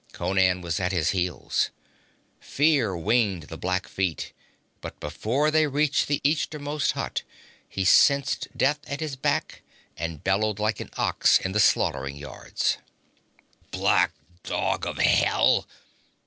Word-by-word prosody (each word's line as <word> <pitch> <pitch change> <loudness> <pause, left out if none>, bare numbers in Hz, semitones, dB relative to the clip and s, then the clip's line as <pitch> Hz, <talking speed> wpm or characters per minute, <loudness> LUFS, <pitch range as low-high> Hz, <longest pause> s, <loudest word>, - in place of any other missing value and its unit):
Conan 90 0 +1
was 85 +2 -2
at 90 0 -1
his 90 -5 +1
heels. 90 -2 -1 0.7
Fear 135 - +1
winged 100 -1 +1
the 80 - -9
black 90 +2 -2
feet, 90 -5 -3 0.5
but - - -8
before 130 - -1
they 155 0 +3
reached 145 +1 +1
the 145 -1 0
easternmost 150 0 0
hut, - - -3 0.5
he 95 - -2
sensed 140 +8 +4
death 145 +3 +2
at 140 - -4
his 155 -4 -4
back, 130 - -2 0.3
and 80 -2 -5
bellowed 100 +2 +1
like 105 0 -1
an - - -7
ox - - +3
in 95 - -3
the 105 - 0
slaughter 70 - +2
yards. 70 -1 -3 0.9
'Black - - +2 0.3
dog - - -2
of - - -5
hell!' - - +3
100 Hz, 135 wpm, -25 LUFS, 90-140 Hz, 0.9 s, sensed